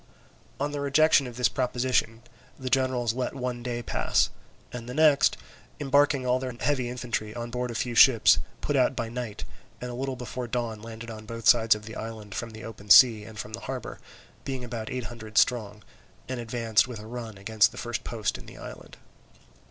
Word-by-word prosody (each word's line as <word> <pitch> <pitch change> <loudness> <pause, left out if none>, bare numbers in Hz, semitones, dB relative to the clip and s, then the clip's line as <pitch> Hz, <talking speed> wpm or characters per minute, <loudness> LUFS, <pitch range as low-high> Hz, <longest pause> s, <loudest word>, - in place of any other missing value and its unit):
On 145 +1 -1
the 145 -1 -3
rejection 140 0 +4
of 120 -1 -9
this 125 - +4
proposition 125 -3 0 0.3
the 130 -1 -5
generals 130 -3 +1
let 130 +2 -3
one 125 -2 -3
day 120 -1 -4
pass, - - +1 0.4
and 120 -1 -7
the 125 - -6
next, 150 -1 +4 0.4
embarking 140 -1 +3
all 125 0 +2
their 130 -1 -4
heavy 130 -4 0
infantry 120 -3 -4
on 120 0 -5
board 125 0 -2
a 120 - -6
few 120 +1 -2
ships, 120 -1 +7 0.2
put - - -1
out - - +3
by 115 -1 -3
night, 120 -3 -5 0.4
and 125 0 -5
a - - -6
little 130 +2 -3
before 125 0 -5
dawn 115 -3 -3
landed 115 +1 -8
on 110 -1 -10
both 115 0 -4
sides 115 -2 +6
of 105 0 -9
the 110 - -8
island 110 -2 -7
from 120 - -4
the 110 +1 -10
open 105 -3 -10
sea 110 0 +8
and 110 0 -11
from 105 +1 -7
the 115 - -4
harbour, 130 -2 -5 0.4
being 130 -2 -4
about 115 -2 -5
eight 125 -1 -3
hundred 110 -3 -8
strong, 105 -4 +2 0.4
and 130 -1 -4
advanced 115 -1 +1
with 125 -3 -7
a 105 - -10
run 115 -2 -7
against 110 +2 +3
the 125 - -13
first 120 -2 -4
post 110 -4 -2
in - - -14
the - - -12
island. - - -10
120 Hz, 200 wpm, -27 LUFS, 110-125 Hz, 0.4 s, sea